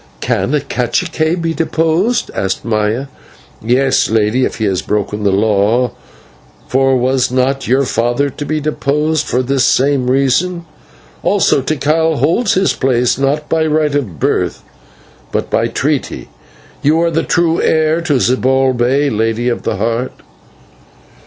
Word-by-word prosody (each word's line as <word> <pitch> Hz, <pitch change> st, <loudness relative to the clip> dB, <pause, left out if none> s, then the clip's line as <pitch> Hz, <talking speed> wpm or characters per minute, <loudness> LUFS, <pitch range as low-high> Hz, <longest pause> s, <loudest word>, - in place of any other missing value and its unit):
"Can 150 Hz, -, 0 dB
a -, -, +2 dB
/cacique/ 160 Hz, +6 st, -1 dB
be 165 Hz, 0 st, -1 dB
deposed?" 165 Hz, +8 st, 0 dB
asked 95 Hz, 0 st, -3 dB
Maya. 110 Hz, +3 st, 0 dB, 0.6 s
"Yes, 130 Hz, +4 st, +2 dB
lady, 110 Hz, +3 st, +1 dB
if -, -, -4 dB
he 110 Hz, -, -2 dB
has 95 Hz, -3 st, 0 dB
broken 105 Hz, 0 st, -2 dB
the 100 Hz, -1 st, +1 dB
law, 110 Hz, +4 st, +2 dB, 0.8 s
for 135 Hz, 0 st, +2 dB
was 130 Hz, +1 st, +1 dB
not 130 Hz, +2 st, 0 dB
your 130 Hz, +3 st, +2 dB
father 120 Hz, +4 st, 0 dB
to 145 Hz, -, -7 dB
be 155 Hz, +1 st, -2 dB
deposed 150 Hz, +1 st, -1 dB
for 125 Hz, -, 0 dB
this 135 Hz, 0 st, 0 dB
same 135 Hz, -1 st, +2 dB
reason? 150 Hz, +7 st, +1 dB, 0.6 s
Also, -, -, +2 dB
Tikal 155 Hz, +2 st, 0 dB
holds 195 Hz, -, +1 dB
his 190 Hz, +1 st, +2 dB
place, 125 Hz, -1 st, +1 dB
not 145 Hz, +2 st, 0 dB
by 160 Hz, -1 st, +1 dB
right 155 Hz, -1 st, +1 dB
of 110 Hz, -, -3 dB
birth, -, -, -1 dB, 0.7 s
but -, -, -3 dB
by -, -, +1 dB
treaty. -, -, -2 dB, 0.5 s
You 155 Hz, +3 st, +2 dB
are 170 Hz, 0 st, +1 dB
the 160 Hz, 0 st, +1 dB
true 170 Hz, 0 st, +1 dB
heir 160 Hz, +1 st, +2 dB
to 160 Hz, -3 st, -1 dB
Zibalbay, 130 Hz, +1 st, +1 dB
Lady 115 Hz, +2 st, 0 dB
of 120 Hz, -, -2 dB
the -, -, -2 dB
Heart." 115 Hz, +5 st, -2 dB
135 Hz, 145 wpm, -15 LUFS, 120-155 Hz, 0.8 s, a